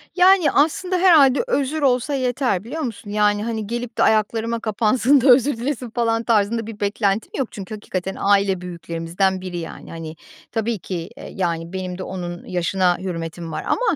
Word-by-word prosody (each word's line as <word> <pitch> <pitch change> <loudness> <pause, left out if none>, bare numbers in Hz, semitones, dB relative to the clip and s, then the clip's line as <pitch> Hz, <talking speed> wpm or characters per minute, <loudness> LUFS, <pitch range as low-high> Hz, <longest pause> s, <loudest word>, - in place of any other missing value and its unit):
Yani 365 -4 +5
aslında 360 +5 +1
herhâlde 315 - +5
özür 295 - 0
olsa 255 +1 +2
yeter 250 -7 0
biliyor 300 +8 -5
musun? 225 -5 -5
Yani, 210 0 +2
hani, 220 -3 -3
gelip 240 +1 -5
de - - +3
ayaklarıma 225 +2 +1
kapansın 230 +5 +2
da 265 - +4
özür 255 +1 +5
dilesin 250 0 -3
falan 230 0 0
tarzında 225 0 +1
bir 220 -2 -8
beklentim 205 0 0
yok. 265 -4 0
Çünkü 200 +1 -8
hakikaten 190 -2 -4
aile 195 -2 +2
büyüklerimizden 175 +2 -2
biri. 185 -2 -5
Yani, 165 -1 -8
hani, 165 -1 -7 0.4
tabii 225 -2 -1
ki, 170 -2 -5
eee, - - -9
yani 170 -2 -2
benim 185 -1 -4
de 185 - -5
onun 175 -2 -6
yaşına 180 0 +1
hürmetim 165 -2 -5
var - - -4
ama. 460 -7 +1
215 Hz, 170 wpm, -21 LUFS, 185-250 Hz, 0.4 s, Yani